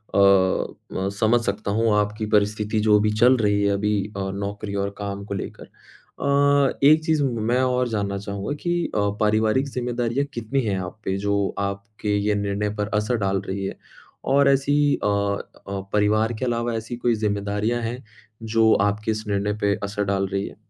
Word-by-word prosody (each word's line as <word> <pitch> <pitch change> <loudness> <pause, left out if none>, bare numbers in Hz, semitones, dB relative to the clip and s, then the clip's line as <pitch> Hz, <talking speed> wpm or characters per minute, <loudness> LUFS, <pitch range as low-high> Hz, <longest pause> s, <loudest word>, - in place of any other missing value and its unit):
अ, - - +3
म 95 0 +2
समझ 115 +2 +4
सकता 100 0 -2
हूँ 110 +1 +2
आपकी 105 +1 -2
परिस्थिति 105 +1 +1
जो 105 -1 +6
भी 105 0 +1
चल 125 +2 +6
रही 105 -2 +2
है 100 - +3
अभी 105 +1 0 0.2
अ, 95 0 -2
नौकरी 100 +1 -4
और 100 - -1
काम 100 -1 -5
को 100 - -5
लेकर। 95 - -6
अ, 140 0 0
एक 155 +3 +6
चीज़ 155 -3 +2
मैं 120 0 0
और 125 -1 +1
जानना 100 -3 -2
चाहूँगा 100 +5 -4
कि 175 0 +1 0.2
अ, - - +2 0.2
पारिवारिक 110 +5 +2
ज़िम्मेदारियाँ 125 +1 -1
कितनी 120 +3 -1
हैं 100 -3 0
आप 100 +4 -10
पे 95 - -1
जो 100 0 0
आपके 100 +1 -3
ये 105 +1 +1
निर्णय 100 +1 -1
पर 105 0 -2
असर 105 +3 0
डाल 95 -2 0
रही 95 +1 -3
है? - - -5 0.5
और 140 +1 +4
ऐसी 140 +1 +2 0.3
अ - - +2
अ, 100 -1 -2
परिवार 110 +2 +2
के 130 - -1
अलावा 120 -1 -1
ऐसी 115 +2 -4
कोई 120 -1 +1
ज़िम्मेदारियाँ 105 +2 -1
हैं 120 +3 -4 0.4
जो 110 0 +3
आपके 105 +2 0
इस 110 0 -3
निर्णय 100 0 0
पर 100 -1 +2
असर 100 +1 -2
डाल 95 0 0
रही 100 0 -1
है? - - -10
105 Hz, 185 wpm, -23 LUFS, 100-120 Hz, 0.5 s, जो